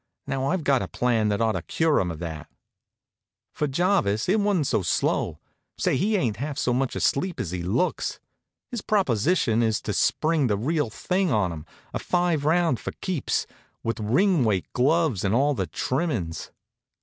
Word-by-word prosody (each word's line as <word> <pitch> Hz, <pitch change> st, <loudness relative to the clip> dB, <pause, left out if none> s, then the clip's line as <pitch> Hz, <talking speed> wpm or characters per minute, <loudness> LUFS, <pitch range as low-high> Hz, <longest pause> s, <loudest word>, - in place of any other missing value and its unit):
Now, 135 Hz, 0 st, -1 dB
I've 175 Hz, +1 st, 0 dB
got 140 Hz, -3 st, +3 dB
a -, -, -3 dB
plan 115 Hz, -3 st, +1 dB
that 105 Hz, +2 st, 0 dB
ought 110 Hz, -1 st, +3 dB
to -, -, -2 dB
cure 160 Hz, -2 st, +1 dB
'em 90 Hz, -, -1 dB
of 85 Hz, -, -5 dB
that." 80 Hz, -3 st, -6 dB, 1.0 s
For 150 Hz, -, -1 dB
Jarvis, 135 Hz, -, +1 dB
it 205 Hz, +4 st, +3 dB
wa'n't 200 Hz, -7 st, +1 dB
so 110 Hz, -, +1 dB
slow. 90 Hz, -, 0 dB, 0.4 s
Say, -, -, +1 dB
he 205 Hz, +11 st, +1 dB
ain't 120 Hz, -, 0 dB
half 140 Hz, +3 st, -4 dB
so 125 Hz, -3 st, +1 dB
much 130 Hz, +1 st, 0 dB
asleep 175 Hz, +5 st, 0 dB
as 85 Hz, -, -3 dB
he 90 Hz, -1 st, -3 dB
looks. 110 Hz, -, -1 dB, 0.5 s
His 240 Hz, -4 st, -3 dB
proposition 135 Hz, -, +2 dB
is 110 Hz, -2 st, +1 dB
to 105 Hz, -, -3 dB
spring 155 Hz, +2 st, +2 dB
the 105 Hz, -3 st, +1 dB
real 145 Hz, +3 st, 0 dB
thing 180 Hz, -, -1 dB
on 105 Hz, -6 st, +1 dB
'em, 80 Hz, 0 st, -9 dB, 0.3 s
a -, -, -2 dB
five 175 Hz, -5 st, 0 dB
round 165 Hz, -3 st, +3 dB
go -, -, -15 dB
for -, -, -2 dB
keeps, 180 Hz, -8 st, -1 dB, 0.4 s
with 115 Hz, 0 st, -2 dB
ring 155 Hz, -, +3 dB
weight 100 Hz, -5 st, +1 dB
gloves, 145 Hz, -, +2 dB
and 100 Hz, +2 st, +1 dB
all 145 Hz, +4 st, +3 dB
the 95 Hz, -9 st, -2 dB
trimmin's. 120 Hz, -, -2 dB
130 Hz, 185 wpm, -25 LUFS, 105-170 Hz, 1.0 s, got